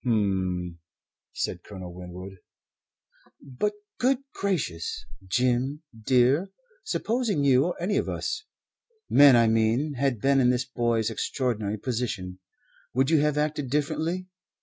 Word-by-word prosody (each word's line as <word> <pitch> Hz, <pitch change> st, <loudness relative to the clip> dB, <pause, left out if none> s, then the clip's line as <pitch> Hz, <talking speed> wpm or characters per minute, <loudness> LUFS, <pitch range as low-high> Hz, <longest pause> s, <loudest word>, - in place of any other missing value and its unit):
"H'm!" 95 Hz, -7 st, 0 dB, 0.5 s
said -, -, -3 dB
Colonel 95 Hz, -3 st, -9 dB
Winwood. 90 Hz, +2 st, -9 dB, 1.0 s
"But, 140 Hz, +11 st, -2 dB, 0.3 s
good 260 Hz, +1 st, +3 dB, 0.2 s
gracious, 420 Hz, -, -2 dB, 0.2 s
Jim, 125 Hz, -, 0 dB
dear, 130 Hz, -, +2 dB, 0.3 s
supposing 230 Hz, -, 0 dB
you 135 Hz, 0 st, +4 dB
or 180 Hz, -, -3 dB
any 190 Hz, +4 st, 0 dB
of -, -, 0 dB
us 445 Hz, -1 st, -3 dB, 0.7 s
men, 140 Hz, -3 st, +8 dB
I 115 Hz, -1 st, +5 dB
mean 115 Hz, +7 st, +2 dB
had 135 Hz, -5 st, +1 dB
been 135 Hz, +4 st, +3 dB
in 125 Hz, -2 st, +4 dB
this 125 Hz, +1 st, +1 dB
boy's 120 Hz, -3 st, 0 dB
extraordinary 110 Hz, -3 st, -2 dB
position 105 Hz, -6 st, -3 dB, 0.6 s
would 135 Hz, +4 st, +2 dB
you 160 Hz, -, +5 dB
have 150 Hz, 0 st, +1 dB
acted 150 Hz, -2 st, -1 dB
differently? 160 Hz, +6 st, -1 dB
130 Hz, 125 wpm, -26 LUFS, 110-150 Hz, 1.0 s, men